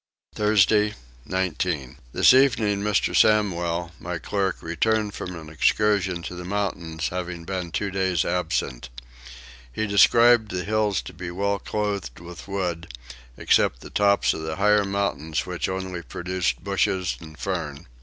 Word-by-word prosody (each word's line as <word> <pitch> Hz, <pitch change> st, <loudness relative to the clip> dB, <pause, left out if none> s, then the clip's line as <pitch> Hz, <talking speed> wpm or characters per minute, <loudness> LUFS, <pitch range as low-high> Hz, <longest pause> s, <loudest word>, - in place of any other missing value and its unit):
Thursday 105 Hz, 0 st, +3 dB, 0.3 s
19. 85 Hz, -7 st, -2 dB
This -, -, +6 dB
evening 115 Hz, -7 st, +3 dB
Mr. 105 Hz, 0 st, +1 dB
Samwel 85 Hz, -5 st, +2 dB
my 90 Hz, 0 st, -4 dB
clerk 95 Hz, +2 st, -2 dB
returned 105 Hz, +5 st, 0 dB
from 90 Hz, -, -6 dB
an 80 Hz, -, -11 dB
excursion 95 Hz, +2 st, +1 dB
to 90 Hz, -, -6 dB
the 90 Hz, 0 st, -7 dB
mountains, 90 Hz, -4 st, -3 dB
having 90 Hz, -1 st, -5 dB
been 90 Hz, -2 st, -4 dB
two 100 Hz, +3 st, -2 dB
days 95 Hz, -2 st, 0 dB
absent. 80 Hz, -8 st, -2 dB, 0.8 s
He 110 Hz, -, -2 dB
described 115 Hz, +2 st, +5 dB
the 90 Hz, -1 st, -3 dB
hills 105 Hz, -2 st, 0 dB
to -, -, -9 dB
be 90 Hz, +1 st, -6 dB
well 100 Hz, +3 st, -1 dB
clothed 100 Hz, -, -3 dB
with 85 Hz, +2 st, -10 dB
wood, 90 Hz, -5 st, -3 dB, 0.5 s
except -, -, +2 dB
the -, -, -11 dB
tops 100 Hz, 0 st, +3 dB
of -, -, -6 dB
the 80 Hz, 0 st, -4 dB
higher 105 Hz, +2 st, +3 dB
mountains 95 Hz, -6 st, -2 dB
which 90 Hz, 0 st, -3 dB
only 95 Hz, -2 st, -4 dB
produced 85 Hz, -7 st, -3 dB
bushes 90 Hz, -2 st, 0 dB
and 80 Hz, -2 st, -12 dB
fern. 70 Hz, 0 st, -4 dB
95 Hz, 145 wpm, -24 LUFS, 85-100 Hz, 0.8 s, This